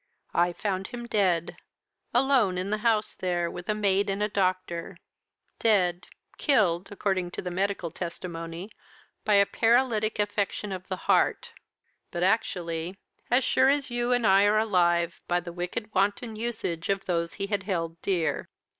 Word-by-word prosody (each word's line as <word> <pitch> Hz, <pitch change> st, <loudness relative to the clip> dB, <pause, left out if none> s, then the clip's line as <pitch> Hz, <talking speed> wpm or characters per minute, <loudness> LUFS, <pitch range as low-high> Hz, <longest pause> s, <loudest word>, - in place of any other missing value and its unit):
I 175 Hz, +1 st, +3 dB
found 190 Hz, +1 st, -3 dB
him 240 Hz, -1 st, -7 dB
dead 185 Hz, -7 st, +1 dB, 0.5 s
alone 245 Hz, -7 st, +3 dB
in 185 Hz, +2 st, -2 dB
the 215 Hz, -, 0 dB
house 220 Hz, -1 st, +1 dB
there, 175 Hz, -2 st, -1 dB
with 175 Hz, +3 st, -8 dB
a 215 Hz, -, +2 dB
maid 200 Hz, -1 st, +2 dB
and 195 Hz, +1 st, -1 dB
a -, -, +2 dB
doctor; 185 Hz, -3 st, -1 dB, 0.6 s
dead 185 Hz, -5 st, +2 dB, 0.3 s
killed, 195 Hz, -, +2 dB
according 190 Hz, -3 st, -1 dB
to -, -, -2 dB
the 180 Hz, -, -4 dB
medical 190 Hz, -2 st, -1 dB
testimony, 170 Hz, +2 st, -6 dB, 0.5 s
by 210 Hz, -, +4 dB
a 200 Hz, 0 st, +6 dB
paralytic 225 Hz, -1 st, +2 dB
affection 205 Hz, 0 st, -1 dB
of 185 Hz, -1 st, -6 dB
the 190 Hz, -, -2 dB
heart; -, -, +2 dB, 0.6 s
but 175 Hz, 0 st, -3 dB
actually, 180 Hz, -4 st, 0 dB, 0.3 s
as 250 Hz, +2 st, +4 dB
sure 260 Hz, +2 st, +4 dB
as 280 Hz, -2 st, +1 dB
you 240 Hz, 0 st, 0 dB
and 245 Hz, -2 st, +2 dB
I 195 Hz, 0 st, +6 dB
are 210 Hz, +1 st, +4 dB
alive, 175 Hz, -5 st, +2 dB
by 175 Hz, 0 st, +2 dB
the 175 Hz, 0 st, -8 dB
wicked 180 Hz, +5 st, -4 dB
wanton 205 Hz, +4 st, 0 dB
usage 215 Hz, -7 st, -3 dB
of 195 Hz, 0 st, 0 dB
those 170 Hz, -2 st, -1 dB
he 195 Hz, -, -3 dB
had 200 Hz, -1 st, -1 dB
held 170 Hz, -4 st, -3 dB
dear. 175 Hz, -5 st, -1 dB
195 Hz, 160 wpm, -27 LUFS, 175-215 Hz, 0.6 s, a